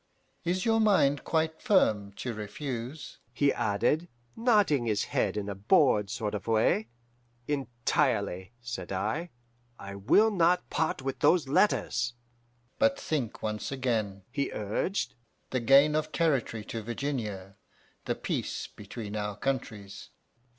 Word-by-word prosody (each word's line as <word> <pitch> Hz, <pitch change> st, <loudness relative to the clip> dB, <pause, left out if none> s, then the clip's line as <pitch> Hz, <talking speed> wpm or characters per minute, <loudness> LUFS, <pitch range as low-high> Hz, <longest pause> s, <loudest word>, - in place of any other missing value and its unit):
Is 180 Hz, +2 st, 0 dB
your 225 Hz, -1 st, +3 dB
mind 165 Hz, -, +3 dB
quite 160 Hz, 0 st, 0 dB
firm 110 Hz, -, +3 dB
to 120 Hz, +4 st, -4 dB
refuse?' 120 Hz, +6 st, -6 dB
he 145 Hz, -1 st, +2 dB
added, 120 Hz, +11 st, +1 dB, 0.3 s
nodding 205 Hz, -, +3 dB
his 105 Hz, -2 st, +1 dB
head 100 Hz, 0 st, 0 dB
in 105 Hz, -1 st, -3 dB
a 100 Hz, -, -2 dB
bored 105 Hz, -, +3 dB
sort 105 Hz, 0 st, -3 dB
of 105 Hz, -1 st, -5 dB
way. 110 Hz, -1 st, +2 dB, 0.6 s
"'Entirely,' 120 Hz, -7 st, 0 dB
said 120 Hz, 0 st, -5 dB
I. 170 Hz, +3 st, -2 dB, 0.5 s
'I 100 Hz, 0 st, -8 dB
will 200 Hz, -, +4 dB
not 180 Hz, -2 st, +2 dB
part 155 Hz, -3 st, 0 dB
with 135 Hz, -1 st, -3 dB
those 170 Hz, -6 st, +4 dB
letters.' 120 Hz, -, +2 dB, 0.7 s
"'But 280 Hz, 0 st, +3 dB
think 140 Hz, -, -3 dB
once 105 Hz, +2 st, -3 dB
again,' 110 Hz, -7 st, -1 dB
he 140 Hz, +3 st, -1 dB
urged; 120 Hz, -, -2 dB, 0.4 s
'the 130 Hz, -, +1 dB
gain 140 Hz, +5 st, +6 dB
of 155 Hz, 0 st, -1 dB
territory 135 Hz, -9 st, 0 dB
to 115 Hz, -, -5 dB
Virginia, 110 Hz, -5 st, -4 dB, 0.5 s
the -, -, -1 dB
peace -, -, -3 dB
between 105 Hz, 0 st, -8 dB
our 105 Hz, -1 st, -3 dB
countries! 110 Hz, -6 st, -4 dB
125 Hz, 130 wpm, -29 LUFS, 105-155 Hz, 0.7 s, gain